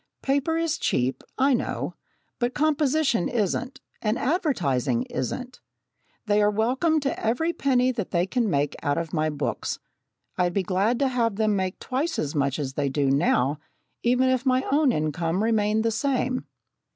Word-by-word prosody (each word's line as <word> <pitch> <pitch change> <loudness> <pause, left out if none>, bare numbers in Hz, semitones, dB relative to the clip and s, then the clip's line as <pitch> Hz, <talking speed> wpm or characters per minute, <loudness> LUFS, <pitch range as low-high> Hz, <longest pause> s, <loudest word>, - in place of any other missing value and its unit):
"Paper 285 +4 +1
is 330 -1 0
cheap, 130 +1 0
I 270 +1 +4
know, 240 - -2 0.5
but 245 +1 -1
composition 295 - +2
isn't, 245 +3 -1 0.2
and 215 +2 0
advertising 155 - 0
isn't. 245 - -4 0.7
They 210 -1 +3
are 205 - +4
welcome 255 +10 +1
to 275 - -2
every 320 +10 +1
penny 255 -4 +2
they 185 -7 -1
can 230 +2 0
make 145 -3 0
out 145 0 0
of 165 -1 -3
my 155 -1 +1
books. 150 -2 -3 0.6
I'd 175 -1 +2
be 195 - +2
glad 195 +6 +1
to 275 - +2
have 235 -4 0
them 215 0 +1
make 185 -1 -2
twice 275 +6 -2
as 145 -1 -2
much 140 -2 0
as 135 -3 -3
they 140 0 0
do 135 0 +1
now, 140 -1 +2 0.4
even 250 +2 +3
if 255 -1 +1
my 260 -1 +2
own 290 -1 +4
income 165 +4 -1
remained 220 -1 +2
the 230 - +2
same." 255 +2 -1
225 Hz, 165 wpm, -25 LUFS, 165-260 Hz, 0.7 s, I